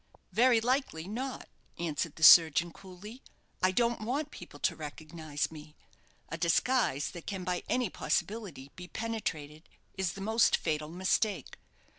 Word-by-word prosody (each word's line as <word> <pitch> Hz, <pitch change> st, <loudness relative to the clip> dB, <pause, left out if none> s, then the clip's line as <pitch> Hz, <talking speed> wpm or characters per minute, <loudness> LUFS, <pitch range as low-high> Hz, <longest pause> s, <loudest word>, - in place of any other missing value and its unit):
"Very 235 Hz, +4 st, +4 dB
likely 240 Hz, -, -1 dB
not," 255 Hz, +6 st, -5 dB, 0.3 s
answered 165 Hz, -2 st, -3 dB
the 160 Hz, -, -7 dB
surgeon, 165 Hz, +1 st, +8 dB
coolly; 200 Hz, +6 st, -12 dB, 0.4 s
"I 185 Hz, -, +4 dB
don't 235 Hz, +3 st, +1 dB
want 280 Hz, +7 st, -2 dB
people 170 Hz, -5 st, -11 dB
to -, -, +1 dB
recognize 155 Hz, 0 st, -5 dB
me. 150 Hz, -1 st, -12 dB, 0.5 s
A 165 Hz, -, -5 dB
disguise 170 Hz, -, +1 dB
that 170 Hz, -, -10 dB
can 190 Hz, -3 st, -4 dB
by 180 Hz, 0 st, -2 dB
any 250 Hz, -2 st, 0 dB
possibility 185 Hz, -11 st, -3 dB
be 180 Hz, 0 st, -9 dB
penetrated 165 Hz, -10 st, -5 dB, 0.2 s
is 190 Hz, -3 st, -2 dB
the 195 Hz, -, -9 dB
most 220 Hz, +3 st, +3 dB
fatal 155 Hz, -2 st, -2 dB
mistake. 185 Hz, +4 st, -1 dB
180 Hz, 140 wpm, -30 LUFS, 160-225 Hz, 0.5 s, surgeon